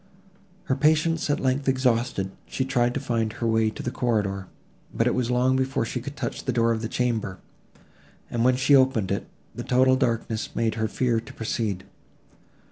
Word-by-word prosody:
Her 130 - 0
patience, 155 +3 +2
at 145 - +1
length, 135 +1 0
exhausted, 125 -6 +1 0.2
she 130 - -2
tried 125 -2 +1
to - - 0
find 115 -4 -1
her 115 - -4
way 110 -1 +2
to 110 - -7
the 125 - -2
corridor, 105 -6 -1 0.4
but - - 0
it - - +2
was 125 -2 0
long 125 +1 +2
before 130 -3 0
she 125 +2 -4
could 140 +4 -7
touch 125 -5 -4
the 130 - +1
door 115 -1 +2
of 110 -1 -1
the 115 - -3
chamber, 115 -7 -1 0.9
and, 115 -1 -1
when 130 +1 +4
she 130 +2 +3
had 140 - +9
opened 125 -7 +1
it, - - -2 0.3
the - - -6
total 130 +1 +4
darkness 115 -3 -1
without - - -22
made 115 -2 +1
her 110 - +2
fear 120 0 0
to 115 - -11
proceed. 110 -4 -2
125 Hz, 200 wpm, -25 LUFS, 115-130 Hz, 0.9 s, had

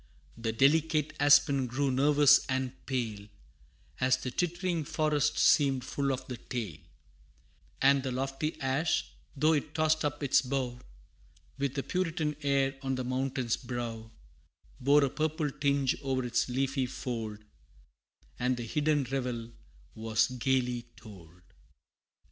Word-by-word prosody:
The 115 -1 -2
delicate 150 +4 +2
aspen 145 -2 +5
grew 135 +3 0
nervous 145 +2 +5
and 130 -1 -1 0.2
pale, 110 -6 -3 0.7
As 130 0 +3
the 130 -1 -5
tittering 175 +1 -1
forest 150 0 0
seemed 135 -4 +4
full 140 +2 -1
of 130 0 -4
the 125 - -5
tale; 120 -2 -5 1.0
And 140 0 +5
the 130 -1 -3
lofty 135 +4 -3
ash, 135 +5 0 0.3
though 155 +3 +4
it 150 0 -2
tossed 155 0 +2
up 145 0 -2
its 135 - +4
bough, 130 -2 -3 0.8
With 140 0 -2
a 140 - -1
puritan 165 -4 -1
air 135 -1 +1
on 135 -1 -1
the 130 - -3
mountain's 130 -1 -1
brow, 120 -3 -5 0.7
Bore 140 +3 +4
a - - -1
purple 155 -1 -1
tinge 140 -1 +1
o'er 130 -2 -1
its 120 +1 0
leafy 135 +1 0
fold, 115 -4 -5 1.0
And 125 0 +1
the 120 - -4
hidden 150 +3 +1
revel 125 -3 -3 0.4
was 110 0 +1
gayly 125 -1 0
told! 90 -5 -14
135 Hz, 130 wpm, -30 LUFS, 125-145 Hz, 1.0 s, aspen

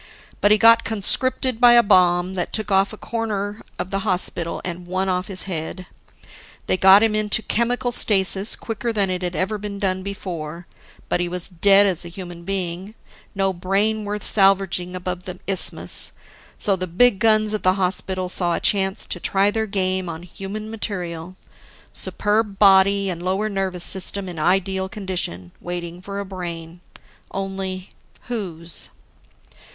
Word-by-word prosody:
But 205 - +4
he 210 - +5
got 230 +1 +6
conscripted 245 +3 0
by 240 -1 +8
a 240 0 +6
bomb 180 -2 +3
that 180 -2 -3
took 215 -2 -2
a 195 0 +5
corner 210 -1 -4 0.2
off 185 - -4
the 195 - -1
hospital 180 -4 -2
and 175 0 -6
one 185 +2 -1
off 180 0 -1
his 190 -3 -1
head. 180 0 -5 0.8
They - - +2
got 190 +3 +7
him 225 -1 +2
into 215 0 +2
chemical 245 +2 -1
stasis 195 -2 +3
quicker 235 +1 -4
than 200 -4 0
it'd 180 -1 -3
ever 210 +3 -2
been 205 0 -6
done 190 -2 -1
before, 175 -4 -6 0.4
but - - 0
he 175 0 -1
was 180 0 -1
dead 195 +2 +4
as 185 -3 +1
a 170 - -7
human 175 -1 -9
being 190 +1 -4 0.4
no 195 -1 +1
brain 200 +5 0
worth 205 0 -4
salvaging 195 -3 +3
above 180 0 -5
the 180 -1 -7
isthmus. 195 -1 +1 0.4
So, 200 -3 +4
the 185 0 -4
big 200 +4 +3
guns 215 0 +4
at 215 - -2
the 185 - +3
hospital 185 0 -2
saw 175 -1 +1
a - - -2
chance 195 -1 +1
to 180 - -2
try 195 +3 +2
their 220 0 -2
game 185 -2 -1
on 165 +1 -7
human 200 +4 -7
material, 180 -5 -5 0.6
superb 210 -1 0
body 195 0 +5
and 170 -1 -6
lower 190 +4 -1
nervous 190 -3 -2
system 190 +1 +3
in 175 -3 -7
ideal 190 +3 0
condition, 180 - -4
waiting 175 0 -6
for 200 +1 -6
a 200 - -4
brain. 175 -3 -7 0.5
Only, 190 -1 -5 0.3
whose? 175 -9 -4
190 Hz, 160 wpm, -21 LUFS, 180-205 Hz, 0.8 s, by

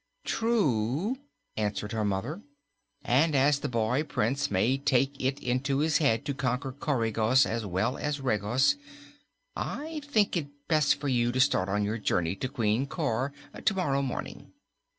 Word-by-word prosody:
"True," 195 - 0 0.4
answered 105 -1 -2
her 110 -1 -1
mother, 105 - -2 0.6
"and, 145 +5 +3
as 140 +1 +4
the 145 - -3
boy 120 +3 +1
Prince 140 0 -1
may 120 +7 +2
take 135 0 +2
it 135 +1 +1
into 130 +3 0
his 155 +1 +2
head 115 -8 +2
to 140 - -1
conquer 130 0 -2
Coregos, 125 -2 +2
as 115 -2 -3
well 95 +7 0
as 150 -1 -2
Regos, 125 - +2 0.8
I 310 +1 -4
think 220 -10 +1
it 160 -5 -1 0.2
best 155 -3 +3
for 145 - -5
you 120 -2 +2
to 130 - -2
start 100 -8 +3
on 105 +1 +1
your 110 +3 -2
journey 90 -3 0
to 130 - -2
Queen 115 +3 0
Cor 125 +1 -1 0.3
tomorrow 175 -10 +1
morning. 135 -3 -5
130 Hz, 150 wpm, -28 LUFS, 110-145 Hz, 0.8 s, as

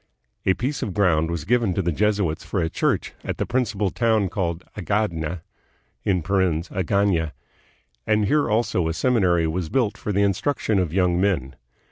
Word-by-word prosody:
A 95 - +4
piece 135 +4 -2
of 95 - -3
ground 80 -5 +2
was 85 -3 -3
given 115 -3 +2
the 90 -3 0
Jesuits 100 -3 0
for 100 - -2
a 80 -1 -1
church - - 0
at - - -4
the - - -1
principal 110 -6 0
town 110 -5 +1
called 85 -3 -2
Agadna 90 -5 -2 0.6
(Agaiia), 90 -1 +1 0.7
and 105 -1 +3
here 145 +3 +2
also 105 -6 +1
a 80 - -2
seminary 90 -7 +2
was 80 +1 -2
built 110 -6 0
for 105 - -3
the 100 0 +2
instruction 100 +1 +1
of 90 -4 0
young 90 0 +2
men. 75 -10 0
95 Hz, 155 wpm, -23 LUFS, 85-105 Hz, 0.7 s, A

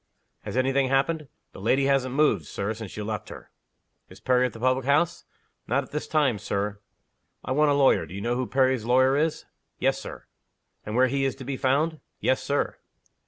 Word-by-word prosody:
"Has - - -5
any 130 +1 +2
thing 135 -1 +2
happened?" 145 +3 +1 0.2
"The - - -11
lady 130 +6 +2
hasn't 135 -2 +1
moved, 150 +1 +2
Sir, 100 +3 -3
since 110 -3 -9
you 105 - -3
left 105 -1 -4
her." - - -11 0.6
"Is - - -14
Perry 125 0 +2
at - - -10
the 115 - -10
public 130 +1 +1
house?" 150 +4 +1 0.4
"Not 135 +4 +1
at - - -16
this 150 - -4
time, 140 -9 +2
Sir." 100 +2 -3 0.7
"I - - -4
want 150 +3 +3
a 145 - +3
lawyer. 140 -2 +3
Do 90 - -9
you 100 - -5
know 120 +3 0
who 125 0 -2
Perry's 130 -3 +2
lawyer 130 +2 +4
is?" 155 +2 0 0.3
"Yes, - - +1
Sir." - - -9 0.6
"And 105 - -3
where 130 +1 +5
he 135 +2 0
is 135 - 0
to 135 - -9
be 135 +1 -3
found?" 150 +5 +1 0.2
"Yes, 130 0 +1
Sir." 140 +2 -1
130 Hz, 210 wpm, -26 LUFS, 120-140 Hz, 0.7 s, where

